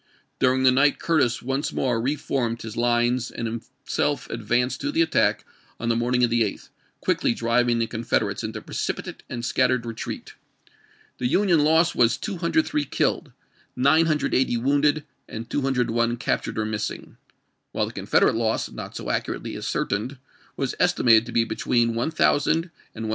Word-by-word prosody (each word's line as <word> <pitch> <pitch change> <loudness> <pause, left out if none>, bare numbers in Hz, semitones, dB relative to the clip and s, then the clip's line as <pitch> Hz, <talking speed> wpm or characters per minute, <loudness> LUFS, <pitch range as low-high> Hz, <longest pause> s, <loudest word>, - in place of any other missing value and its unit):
During 130 0 +3
the 130 - +6
night 140 +3 +3
Curtis 145 -8 +1
once 135 +3 -1
more 120 -4 0
re 135 +5 0
formed 120 -5 -2
his 110 0 -7
lines 120 +1 +1
and 115 - -5
himself 130 +4 -3
advanced 120 +3 0
to 290 - -1
the 325 +3 +3
attack - - +1 0.3
on 115 - -2
the 115 - +2
morningof 120 +1 +2
the 120 0 +1
8th, 105 -3 -2 0.3
quickly 120 - +1
driving 120 +1 +2
the 115 - +1
Confederates 110 -3 -1
into 110 0 -5
precipitate - - -4
and 120 -1 -4
scattered 125 -1 +1
retreat. 115 -1 -6 0.9
The 125 - 0
Union 180 +3 +3
loss 160 +2 +4
was, 120 -1 +3
203 180 - 0
killed, - - -1 0.4
980 140 -2 +2
wounded, 145 +4 +2 0.3
and 115 +1 -6
201 120 -3 0
captured - - -2
or 110 - 0
missing; 105 0 -4 0.5
while - - 0
the - - -8
Confederate - - +2
loss, 110 -1 -1
not - - -8
so - - -4
accurately - - -3
ascertained, 115 +8 -2 0.4
was - - -1
estimated 115 -1 +4
to - - -6
be 115 - +3
between 115 +1 0
1000 145 +3 +2 0.4
and 110 0 -5
1300. - - -3
120 Hz, 155 wpm, -24 LUFS, 115-140 Hz, 0.9 s, the